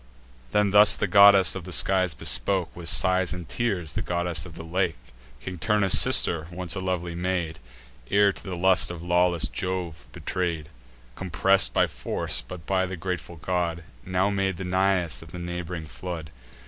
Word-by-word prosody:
Then 105 +3 +1
thus 105 +1 +6
the - - -1
goddess 100 0 +6
of 95 - -6
the 90 - -9
skies 95 -2 +2
bespoke, 85 +11 -1
With 85 -1 -2
sighs 95 0 +3
and 90 -3 -8
tears, 95 -9 -2
the - - -3
goddess 85 0 -2
of 85 - -13
the 80 - -9
lake, 85 -1 -2 0.4
King 90 -2 -8
Turnus' 105 -1 +5
sister, 85 -2 +3
once 90 -1 -4
a - - -3
lovely 90 -2 -3
maid, 85 -3 -3 0.5
Ere 100 0 +3
to - - -13
the 95 -3 -6
lust 95 +1 +3
of 85 -1 -8
lawless 90 -1 +2
Jove 90 -8 -5
betray'd: 85 -5 -4 0.5
Compress'd 95 +1 +2
by - - +2
force, - - -2
but, 90 -2 -11
by 95 -1 0
the 95 0 -6
grateful 90 0 -5
god, 85 0 -3 0.2
Now 95 +2 0
made 95 -2 -1
the 95 - -6
Nais 90 -6 0
of - - -13
the - - -8
neighb'ring 85 -1 -6
flood. 80 -1 -8
90 Hz, 175 wpm, -25 LUFS, 85-95 Hz, 0.5 s, thus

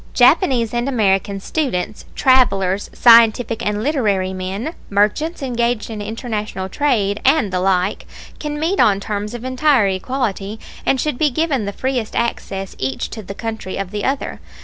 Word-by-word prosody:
Japanese 245 - +4
and 240 +3 0
American 200 -5 +1
students, 215 - -2
travelers, 200 -7 +3
scientific 230 -1 +5
and 210 +1 -1
literary 205 -10 0
men, 190 - -4 0.2
merchants 245 +11 0
engaged 240 -3 -1
in 215 -2 -5
international 215 -3 -4
trade, 215 -6 0
and 265 -8 +3
the 180 - +1
like 185 +1 0 0.3
can 295 -1 -4
meet 345 +6 0
on 200 -2 +4
terms 210 +2 -4
of 240 +1 -7
entire 255 -3 +3
equality 210 0 -3 0.3
and 265 - +3
should 300 -3 -1
be 305 - +3
given 275 -4 0
the 200 - -2
freest 250 0 -2
access 195 -4 -3
each 130 0 -3
to 220 - -6
the 195 0 -8
country 220 -4 -5
of 195 -1 -4
the 205 -1 -3
other. 270 +1 -2
220 Hz, 155 wpm, -19 LUFS, 195-260 Hz, 0.3 s, scientific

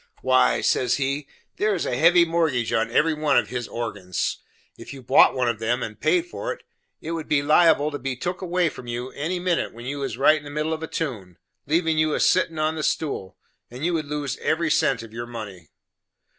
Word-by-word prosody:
"Why," 130 0 +3
says 125 -1 +2
he, 140 +1 -2 0.3
"there 210 -1 +1
is 175 - -2
a - - -1
heavy 170 +5 +5
mortgage 160 -8 0
on 115 +1 +1
every 155 +7 +2
one 150 -1 +1
of - - +2
his 120 -2 -4
organs. 100 -6 -3 0.4
If - - -10
you 135 - -11
bought 120 - +5
one 125 -2 +1
of 115 -2 -1
him, 120 +2 0
and 110 -1 -7
paid 355 -2 +2
for 355 - -5
it, - - -8 0.4
it 160 - -5
would 165 -2 -4
be 140 -2 +2
liable 155 0 +4
to 145 - -5
be 135 0 -3
took 175 +9 -4
away 180 -1 +1
from 125 - -11
you 120 +2 -4
any 165 +6 -3
minute 175 -8 -1
when 120 +1 -10
you 140 +2 -4
was 135 -5 -4
right 155 +4 +5
in - - -16
the 145 - -9
middle 150 +2 -2
of 160 - -5
a 160 - -4
tune, 105 - -5 0.3
leavin' 160 +1 +1
you 155 -1 +2
a - - -1
settin' 170 -3 +2
on 155 +1 +1
the 160 - -4
stool; 140 - -2 0.3
and 125 +6 -6
you 175 - +1
would 155 -3 -2
lose 145 -3 -3
every 160 0 0
cent 130 -5 +2
of 115 -1 -12
your 120 +1 -6
money." 105 -9 -9
145 Hz, 225 wpm, -24 LUFS, 120-160 Hz, 0.4 s, heavy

